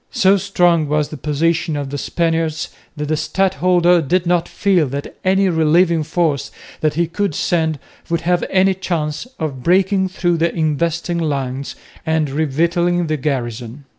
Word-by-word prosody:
So 190 +1 +3
strong 175 -5 +2
was 150 0 0
the 155 - -7
position 155 +3 0
of 140 -2 -4
the 145 - -3
Spaniards 165 -1 -1 0.3
that 150 - -2
the 155 - +1
stadholder 180 +1 +2
did 175 +4 0
not 175 0 +1
feel 185 -7 +2
that 140 +2 -6
any 190 +1 +3
relieving 165 0 +3
force 155 -3 -1 0.3
that 155 -1 0
he 170 +2 +2
could 170 0 -2
send 160 -3 0 0.3
would 170 0 0
have 175 +1 +1
any 190 0 +3
chance 170 0 -3
of 140 -5 -4
breaking 190 +4 +2
through 175 -2 0
the 165 +1 +1
investing 170 +2 -1
lines 140 -4 -3 0.3
and 160 -2 0
revictualling 170 +4 0
the 155 - 0
garrison. 125 -2 -4
165 Hz, 155 wpm, -18 LUFS, 150-175 Hz, 0.3 s, So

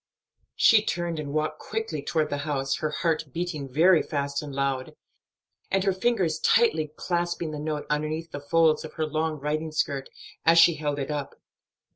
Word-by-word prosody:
She 220 -2 +6
turned 175 -5 -2
and 145 -2 -5
walked 155 +1 -1
quickly 220 -9 -4
toward 155 +1 -1
the 145 - -1
house, 135 -2 -1
her 155 - -1
heart 160 0 0
beating 155 -4 -4
very 165 +4 +5
fast 140 -1 -2
and 150 -1 -7
loud, 135 -1 -2 0.7
and 195 0 +1
her 195 -1 +2
fingers 185 -6 0
tightly 160 -10 +3
clasping 175 -2 -2
the 150 - -5
note 150 0 -3
underneath 155 +2 -2
the 145 - -5
folds 160 +2 +2
of 155 - -9
her 160 - -1
long 155 0 -2
riding 155 +2 -2
skirt, 140 -3 -1 0.3
as 165 +1 +5
she 170 +1 +8
held 145 -1 -2
it 140 +1 -3
up. 145 -2 -4
155 Hz, 175 wpm, -26 LUFS, 145-170 Hz, 0.7 s, she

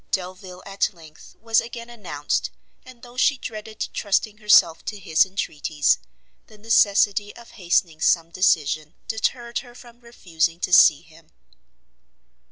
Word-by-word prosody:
Delvile, 185 0 -5
at 195 0 -1
length, 155 -2 -16
was 225 0 +2
again 235 0 -9
announced; 185 -11 -3 0.3
and 250 -2 -16
though 245 0 -14
she 275 +2 +3
dreaded 215 -2 -7
trusting 210 +1 -1
herself 190 -6 +4
to 210 - -5
his 175 -3 +2
entreaties, 155 - -1 0.5
the 215 - -17
necessity 205 -1 +2
of 235 0 -15
hastening 170 -4 -1
some 165 -1 +2
decision 155 -4 0
deterred 235 +2 -2
her 245 -2 -14
from 240 -1 -16
refusing 170 -8 -3
to 180 - -2
see 150 -4 +6
him. 160 0 -20
195 Hz, 135 wpm, -23 LUFS, 165-225 Hz, 0.5 s, see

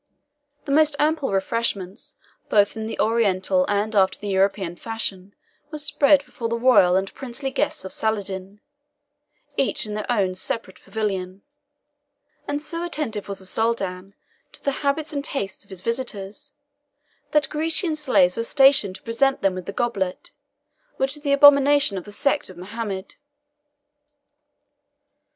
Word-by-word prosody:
The 285 - -3
most 305 0 +4
ample 300 -3 +1
refreshments, 195 -1 -2 0.3
both 205 0 +3
in 220 0 -4
the - - -6
Oriental 225 +4 +2
and 205 +2 -1
after 190 -1 +3
the 205 - -6
European 195 -2 +1
fashion, 200 -2 -3 0.3
were 305 - -6
spread 290 -1 +4
before 235 -5 -5
the 235 - -1
royal 230 -7 +5
and 190 +1 -1
princely 265 +1 -5
guests 290 -6 -1
of 190 - -7
Saladin, 200 -2 -3 1.0
each 275 - 0
in 210 - -5
their 215 +3 -3
own 195 -6 +1
separate 190 +5 -4
pavilion; 195 -3 -3 1.0
and 290 0 -1
so 335 +1 -4
attentive 295 - -3
was 200 -1 -5
the 190 - -10
Soldan 195 -3 -2 0.4
to - - -13
the 280 - +1
habits 300 +2 -1
and 280 -1 -2
taste 200 -11 -4
of 200 - -23
his 190 -2 -6
visitors, 230 +1 -4 0.8
that 300 -2 +2
Grecian 320 +2 +1
slaves 205 -12 +3
were 230 - -1
stationed 270 -5 +4
to - - -10
present 265 +3 +1
them 195 -1 +3
with 185 -1 -7
the - - -3
goblet, 195 -5 -2 0.7
which 270 +2 +1
is - - -14
the 285 -1 -1
abomination 280 -4 +6
of 175 - -13
the 205 - -10
sect 280 +4 0
of 185 - -12
Mohammed. 200 0 -6
225 Hz, 150 wpm, -23 LUFS, 195-280 Hz, 1.0 s, abomination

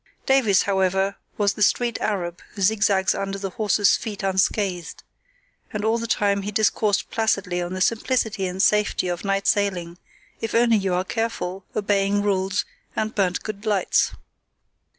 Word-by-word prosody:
Davies, 250 -8 +4
however, 190 0 +1 0.2
was 205 -1 +2
the - - -9
street 235 +3 +2
arab 175 -5 -2
who 200 - -3
zigzags 200 -2 +3
under 195 0 -3
the 195 -1 -4
horses' 205 0 +3
feet 210 -3 -6
unscathed; 190 -1 -1 0.7
and 215 -2 -3
all 225 +1 +2
the 230 - -4
time 200 -3 +1
he 200 - -4
discoursed 210 0 +1
placidly 200 -5 0
on 175 +1 -4
the 185 - -4
simplicity 220 -2 0
and 185 +2 -1
safety 210 -3 +2
of 175 -1 -3
night 195 0 0
sailing 180 -4 0 0.4
if 225 -1 -3
only 230 -1 +4
you 190 -3 0
are 180 - 0
careful, 195 -3 -3
obeying 205 -1 +1
rules, 195 -1 0 0.3
and 215 0 -1
burnt 185 -3 0
good 210 -1 -6
lights. 205 -3 +2
200 Hz, 155 wpm, -23 LUFS, 190-215 Hz, 0.7 s, Davies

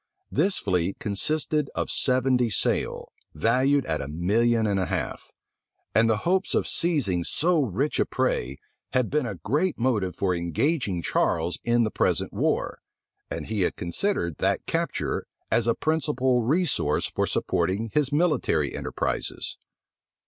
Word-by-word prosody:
This 185 +6 +2
fleet 90 -1 0
consisted 150 +8 0
of - - -1
seventy 125 -1 +2
sail, 105 - -1 0.2
valued 130 - +2
at 80 -1 -1
a 65 - -5
million 110 +9 +1
and 100 -2 +1
a 95 - 0
half; - - -4 0.6
and 115 +2 +4
the 110 - +3
hopes 185 +2 +1
of - - +1
seizing 135 - +1
so 165 - +2
rich 135 +4 -1
a - - +3
prey 65 +3 -1 0.4
had 125 -2 +1
been 150 -3 +1
a 105 - -4
great 155 - 0
motive 110 -7 0
for 95 -2 0
engaging 90 - -1
Charles 85 +1 0
in 120 0 +3
the 110 - -1
present - - 0
war, - - -1 0.5
and - - -4
he 110 -2 -2
had 90 - +1
considered 85 - -1
that - - 0
capture - - -2 0.2
as 115 -1 +2
a 115 - +3
principal 130 -5 +1
resource 135 - +1
for - - -1
supporting 105 +4 -1
his 150 -2 +2
military 145 - +1
enterprises. - - -3
115 Hz, 145 wpm, -26 LUFS, 95-145 Hz, 0.6 s, and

